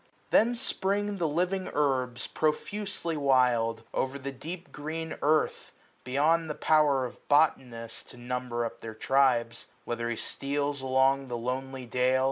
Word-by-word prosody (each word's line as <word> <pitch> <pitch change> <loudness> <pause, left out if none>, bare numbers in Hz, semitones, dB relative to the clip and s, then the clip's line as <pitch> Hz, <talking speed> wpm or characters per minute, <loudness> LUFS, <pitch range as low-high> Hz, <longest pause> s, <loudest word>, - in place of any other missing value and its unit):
220 - - +7
Then 245 - -2
spring 205 -2 0
the 170 -3 +1
living 180 +5 0
herbs, 130 -4 +1
profusely 170 +2 -2
wild, 125 -5 +2
0*er - - -1
all 140 - -6
the 140 +1 -5
deep 170 +7 -8
green 160 +2 -5
earth, 155 +1 +1 0.3
beyond 155 +5 +2
the 150 - -3
power 150 -4 +3
Of 125 - -10
botanist 125 -6 +1
to 125 - -12
number 120 -1 -2
up 115 - -7
their 110 -1 -7
tribes: 125 -2 +2 0.2
Whether 120 0 -2
he 120 - -1
steals 140 +3 -2
along 135 +1 +2
the 120 -1 -3
lonely 130 +2 -4
dale. 125 +2 +2
135 Hz, 150 wpm, -29 LUFS, 125-155 Hz, 0.3 s, 220